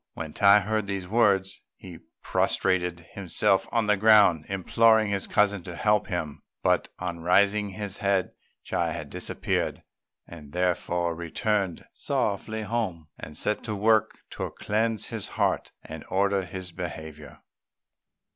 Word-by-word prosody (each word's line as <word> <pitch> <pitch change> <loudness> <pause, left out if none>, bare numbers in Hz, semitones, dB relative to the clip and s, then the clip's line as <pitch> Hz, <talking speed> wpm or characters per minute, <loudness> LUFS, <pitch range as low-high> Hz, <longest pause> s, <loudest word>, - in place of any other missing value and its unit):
When 80 -2 -6
Tai 100 +1 +6
heard 110 +1 -1
these 95 -2 -4
words 100 -3 +2
he 90 -3 -11 0.2
prostrated 90 -2 0
himself 95 -4 0
on 115 -1 +1
the 105 0 +3
ground, 100 -6 +5
imploring 110 +3 +3
his 100 -1 -1
cousin 100 -2 +2
to 85 0 -8
help 105 +3 +2
him; 85 -6 -4 0.2
but, - - +2
on 90 -2 -4
raising 100 +4 +3
his 100 0 -5
head, 100 -2 0 0.4
Chi 85 -2 -1
had 75 -4 -7
disappeared; - - -2 0.4
he 85 - -10
therefore 85 +2 -1
returned 95 +3 -2
sorrowfully 110 +2 -2
home, 100 -8 -3
and 75 - -9
set 105 - -1
to 110 -2 -3
work 110 +1 +2
to - - -4
cleanse 110 0 -1
his 110 -4 -4
heart - - 0
and - - -8
order 100 0 +1
his 95 -1 -7
behaviour. 80 -4 -8
95 Hz, 135 wpm, -26 LUFS, 85-105 Hz, 0.4 s, Tai